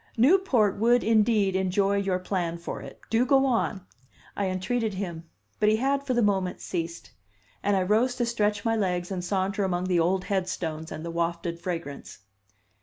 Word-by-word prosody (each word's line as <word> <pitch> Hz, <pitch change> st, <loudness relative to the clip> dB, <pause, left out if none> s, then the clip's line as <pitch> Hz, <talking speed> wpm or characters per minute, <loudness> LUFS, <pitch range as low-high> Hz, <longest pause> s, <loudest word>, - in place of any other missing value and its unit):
"Newport 255 Hz, -, +4 dB
would, 240 Hz, +3 st, +3 dB
indeed, 215 Hz, -3 st, +3 dB
enjoy 195 Hz, +1 st, +1 dB
your 195 Hz, -2 st, 0 dB
plan 180 Hz, -2 st, -2 dB
for 170 Hz, -, -6 dB
it. -, -, -11 dB
Do 225 Hz, +2 st, +4 dB
go 270 Hz, +1 st, +4 dB
on!" 225 Hz, -6 st, 0 dB, 0.5 s
I 200 Hz, -, -1 dB
entreated 205 Hz, +4 st, -1 dB
him 170 Hz, -4 st, -5 dB, 0.3 s
But 210 Hz, -, +4 dB
he 215 Hz, -, +4 dB
had, 275 Hz, +4 st, 0 dB
for 255 Hz, -, +1 dB
the 240 Hz, -, +3 dB
moment, 190 Hz, -3 st, 0 dB
ceased; 170 Hz, -1 st, -5 dB, 0.5 s
and 205 Hz, 0 st, +1 dB
I 185 Hz, -, +2 dB
rose 225 Hz, +6 st, +2 dB
to 245 Hz, -2 st, 0 dB
stretch 210 Hz, -3 st, 0 dB
my 225 Hz, 0 st, +2 dB
legs 180 Hz, -3 st, -1 dB
and 180 Hz, -2 st, -3 dB
saunter 195 Hz, +2 st, -1 dB
among 180 Hz, -2 st, 0 dB
the 180 Hz, -2 st, +1 dB
old 180 Hz, +3 st, +1 dB
headstones 180 Hz, -5 st, -3 dB
and 155 Hz, -, -6 dB
the 170 Hz, -, -4 dB
wafted 170 Hz, 0 st, -2 dB
fragrance. 165 Hz, -5 st, -5 dB
195 Hz, 180 wpm, -27 LUFS, 180-225 Hz, 0.5 s, Newport